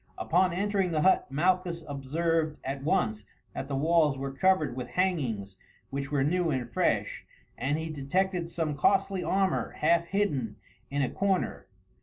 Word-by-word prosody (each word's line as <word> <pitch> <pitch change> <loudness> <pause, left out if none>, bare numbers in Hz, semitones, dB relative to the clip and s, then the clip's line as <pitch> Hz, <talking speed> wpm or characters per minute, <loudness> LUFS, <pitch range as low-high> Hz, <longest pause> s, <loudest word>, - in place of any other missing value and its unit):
Upon 180 +2 +2
entering 195 +1 0
the 155 -3 0
hut 190 +3 +4
Malchus 175 +2 +1
observed 155 +3 -1
at 135 +1 -4
once 110 -8 +1 0.3
that 135 - -5
the 140 - -3
walls 155 -1 +3
were 135 0 -4
covered 155 -3 +2
with 125 -1 -4
hangings 125 - -1 0.3
which 140 +1 -4
were 140 -2 +2
new 175 +3 +1
and 125 -5 -2
fresh, - - 0 0.3
and 145 +3 -1
he 160 0 -3
detected 170 +5 -1
some 160 -3 -2
costly 195 +4 +2
armour 190 -1 0
half 170 +2 +2
hidden 145 - -1 0.3
in 140 0 0
a 130 - 0
corner. 195 -1 -1
160 Hz, 155 wpm, -29 LUFS, 135-180 Hz, 0.3 s, hut